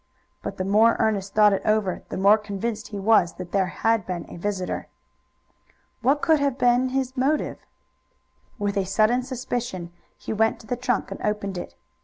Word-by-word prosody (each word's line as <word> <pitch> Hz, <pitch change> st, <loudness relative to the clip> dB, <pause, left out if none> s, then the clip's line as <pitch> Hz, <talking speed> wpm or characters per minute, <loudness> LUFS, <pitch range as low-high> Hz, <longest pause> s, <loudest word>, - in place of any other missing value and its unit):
But -, -, -6 dB
the 185 Hz, -, -1 dB
more 215 Hz, +4 st, +4 dB
Ernest 200 Hz, -2 st, 0 dB
thought 210 Hz, -1 st, +6 dB
it 195 Hz, -, 0 dB
over 215 Hz, -4 st, +1 dB
the -, -, -4 dB
more 200 Hz, +3 st, +5 dB
convinced 210 Hz, +2 st, -4 dB
he 205 Hz, -, -7 dB
was 200 Hz, -4 st, +3 dB
that 180 Hz, -1 st, -9 dB
there 195 Hz, -2 st, +2 dB
had 225 Hz, +3 st, +1 dB
been 175 Hz, -3 st, -4 dB
a -, -, -10 dB
visitor. 185 Hz, +1 st, -3 dB, 1.1 s
What 275 Hz, +5 st, +2 dB
could 320 Hz, -2 st, +4 dB
have 280 Hz, -2 st, 0 dB
been 245 Hz, +1 st, +3 dB
his 260 Hz, 0 st, -2 dB
motive? 280 Hz, +4 st, 0 dB, 1.0 s
With 200 Hz, -2 st, 0 dB
sudden 215 Hz, +5 st, +3 dB
suspicion 245 Hz, -8 st, -4 dB, 0.2 s
he -, -, -5 dB
went 220 Hz, +1 st, +1 dB
to -, -, -16 dB
the 245 Hz, -, -2 dB
trunk 245 Hz, 0 st, -1 dB
and -, -, -6 dB
opened 210 Hz, -2 st, -2 dB
it. 175 Hz, -, -7 dB
215 Hz, 175 wpm, -24 LUFS, 195-245 Hz, 1.1 s, thought